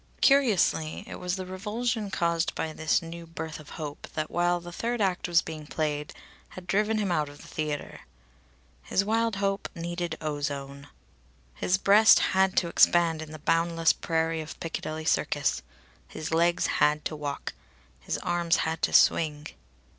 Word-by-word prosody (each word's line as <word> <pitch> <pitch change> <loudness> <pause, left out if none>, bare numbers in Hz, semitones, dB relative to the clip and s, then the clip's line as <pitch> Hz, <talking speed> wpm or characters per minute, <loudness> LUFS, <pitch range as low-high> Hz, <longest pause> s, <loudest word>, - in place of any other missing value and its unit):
Curiously, 210 - +3
it - - -8
was 180 0 -2
the 190 -1 -5
revulsion 210 +4 -3
caused 170 -2 0
by 160 - -3
this 160 +2 +1
new 165 0 -8
birth 160 -1 -6
of 155 - -13
hope 150 -2 -6
that, 155 0 -3
while 175 0 +1
the 175 0 -10
third 235 +6 -2
act 190 -4 0
was 175 -1 +3
being 155 -2 -8
played, 150 -1 -2 0.4
had 185 - -10
driven 210 +4 +1
him 205 -4 0
out 150 -4 0
of 145 - -13
the - - -13
theatre. 150 -2 -4 0.8
His 195 - 0
wild 225 0 +1
hope 195 0 -1
needed 170 -1 -4
ozone. 145 -2 -4 0.7
His 180 - +1
breast 205 +3 +7 0.2
had 190 0 +2
to 175 - +3
expand 170 -1 +4
in 155 -1 -8
the 155 - -7
boundless 165 +2 +2
prairie 165 -1 -1
of 155 - -9
Piccadilly 160 -1 -5
Circus. - - +1 0.5
His 155 +1 -6
legs 170 +1 +2 0.2
had 150 0 +3
to 155 - -2
walk. 145 -2 -5 0.5
His - - -3
arms 175 -1 +1
had 160 0 -2
to - - 0
swing. 150 -1 +3
165 Hz, 160 wpm, -27 LUFS, 155-185 Hz, 0.8 s, breast